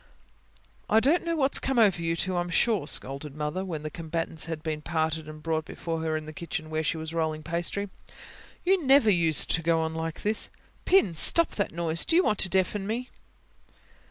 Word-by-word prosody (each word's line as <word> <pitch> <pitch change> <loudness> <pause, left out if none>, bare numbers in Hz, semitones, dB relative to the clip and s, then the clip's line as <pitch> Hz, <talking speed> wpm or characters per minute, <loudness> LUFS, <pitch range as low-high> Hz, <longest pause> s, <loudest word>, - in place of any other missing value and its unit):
"I 220 - +5
don't 295 +9 +2
know 335 -1 -1
what's 275 -3 +2
come 270 -1 -2
over 200 -7 +4
you 165 0 0
two, 185 +2 -2
I'm 175 0 -1
sure," 205 -3 +1
scolded 140 0 -3
Mother, 150 +5 -3
when 160 -5 -5
the 155 - -5
combatants 165 -1 -3
had 160 -1 -5
been 155 -1 -3
parted 160 -1 -2
and 155 0 -11
brought 160 -1 -1
before 165 0 -5
her 160 -1 -1
in 155 - -7
the 155 - -9
kitchen, 155 -1 -6
where 155 0 0
she 160 +1 -1
was 160 0 -6
rolling 160 -2 -2
pastry. 170 +5 -3 0.8
"You 375 -1 +3
never 265 -5 +5
used 165 -4 +3
to 165 - +2
go 165 0 +2
on 160 0 -2
like 160 0 -5
this. 210 +1 0 0.4
Pin, 365 - +4
stop 335 - +5
that 200 - -2
noise. 165 0 0
Do 325 - 0
you 360 - +5
want 210 - 0
to 190 - +1
deafen 190 +2 0
me?" 240 +4 -4
165 Hz, 205 wpm, -27 LUFS, 160-205 Hz, 0.8 s, I